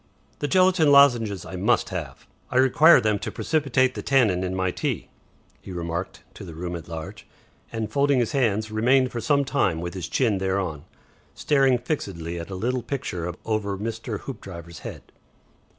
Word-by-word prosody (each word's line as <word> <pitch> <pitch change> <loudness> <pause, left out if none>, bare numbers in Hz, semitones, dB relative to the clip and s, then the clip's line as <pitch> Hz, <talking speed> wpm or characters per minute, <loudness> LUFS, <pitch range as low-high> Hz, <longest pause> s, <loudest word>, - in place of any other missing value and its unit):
"The 145 - -1
gelatine 185 -3 +4
lozenges 120 -9 +4
I - - -7
must - - +1
have. - - -6 0.2
I - - -1
require 140 +6 +6
them 105 -2 +1
to - - -5
precipitate 130 -4 +1
the - - -5
tannin 110 -10 +2
in 95 0 -2
my 95 -1 0
tea," - - -3 0.5
he - - -10
remarked 85 -1 -5
to - - -10
the 80 - -9
room 90 +1 -4
at 85 - -8
large, 80 -2 -8 0.4
and 110 -1 -4
folding 140 +2 +2
his 120 -2 +1
hands, 110 -6 0
remained 125 +4 +3
for 120 - -4
some 140 +3 +2
time 95 - 0
with 85 +1 -5
his 95 -3 -5
chin 110 -7 +1
thereon, 95 -6 -2 0.5
staring 135 -3 +3
fixedly 90 - -4
at 85 - -7
a 95 - -5
little 125 +6 -1
picture 90 -9 -4
over 105 -3 -1
Mr. 110 +1 -4
Hoopdriver's 85 - -9
head. - - -8
110 Hz, 170 wpm, -24 LUFS, 90-135 Hz, 0.5 s, require